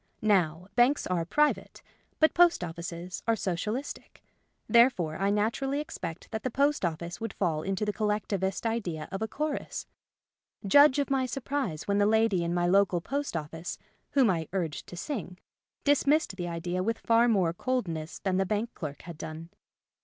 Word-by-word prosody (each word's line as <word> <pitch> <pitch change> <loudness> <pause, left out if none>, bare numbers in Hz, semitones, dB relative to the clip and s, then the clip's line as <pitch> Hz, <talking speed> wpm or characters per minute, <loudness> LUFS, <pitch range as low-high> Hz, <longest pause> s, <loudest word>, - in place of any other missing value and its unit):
Now, 180 -5 +2
banks 250 +4 +4
are 175 -2 0
pri 295 - +3
vate; - - -15 0.4
but 315 - +5
post 345 - +5
offices 170 +1 -6
are 230 - +4
Socialistic: 210 +7 -4 0.4
there 235 +2 +7
fore 170 -10 -4
I 195 +2 +1
naturally 230 +7 0
expected 175 - -6
that 220 -1 -3
the 255 - -2
post 280 +2 +1
office 170 +2 -3
would 225 - -3
fall 165 -5 0
into 195 +4 -1
the 210 - -1
collectivist 200 -2 -1
idea 185 -9 -2
of 195 +1 -4
a 220 - 0
chorus. 300 +5 -3 0.8
Judge 285 +6 +7
of 280 -1 0
my 265 -1 +2
surprise 265 - -3
when 200 0 +2
the 205 - +4
lady 220 -4 +3
in 170 - -1
my 175 0 +1
local 190 0 +3
post 280 +2 -3
office 160 +2 -5 0.4
(whom 270 -4 +5
I 165 -3 -2
urged 170 -6 -3
to 175 - -9
sing) 185 - -5 0.5
dismissed 290 -4 +3
the 175 -2 -4
idea 175 +2 -2
with 225 +4 0
far 230 +1 +3
more 190 -8 +2
coldness 170 -8 -2
than 190 -2 -1
the 190 - +2
bank 215 +4 -1
clerk 145 -5 -7
had 170 -3 -9
done. 160 +1 -7
195 Hz, 175 wpm, -29 LUFS, 170-240 Hz, 0.8 s, there